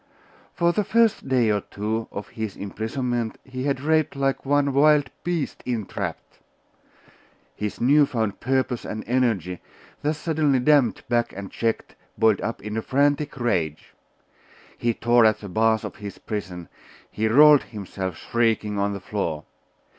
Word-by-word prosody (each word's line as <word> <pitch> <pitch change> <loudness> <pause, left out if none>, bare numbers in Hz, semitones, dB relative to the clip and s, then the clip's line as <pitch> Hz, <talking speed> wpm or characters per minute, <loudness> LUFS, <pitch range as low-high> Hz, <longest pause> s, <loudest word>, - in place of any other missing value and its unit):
For 170 0 +2
the 210 - +1
first 230 -5 +2
day 120 -4 +3
or 105 -1 +1
two 110 +3 -3
of 100 - -7
his 110 -3 -5
imprisonment 115 +3 -3
he 130 0 -6
had 140 -2 0
raved 155 0 +1
like 135 -1 0
some 140 0 +1
wild 145 -1 +4
beast 175 -4 -2
entrapped. 115 -5 -4 1.2
His 105 -1 -4
new 145 +4 +5
found 110 -6 -2
purpose 130 -1 0
and 110 - -5
energy, 110 -8 0 0.4
thus 150 +1 -1
suddenly 155 -4 +1
dammed 130 -3 +3
back 120 -1 +1
and 100 0 -7
checked, 115 -1 -2 0.2
boiled 110 -2 +3
up 115 - -4
in 105 +1 -3
frantic 145 +2 +1
rage. 85 -11 -1 0.8
He 120 -1 -1
tore 120 0 +4
at 110 -1 +4
the 100 -2 -9
bars 110 +3 +2
of - - -7
his 100 -2 -8
prison; 90 -5 -6 0.4
he 110 +1 0
rolled 145 +5 +7
himself, 95 -5 -6
shrieking, 110 -3 0
on 100 0 0
the 100 - -5
floor. 90 -6 -3
115 Hz, 145 wpm, -24 LUFS, 105-140 Hz, 1.2 s, rolled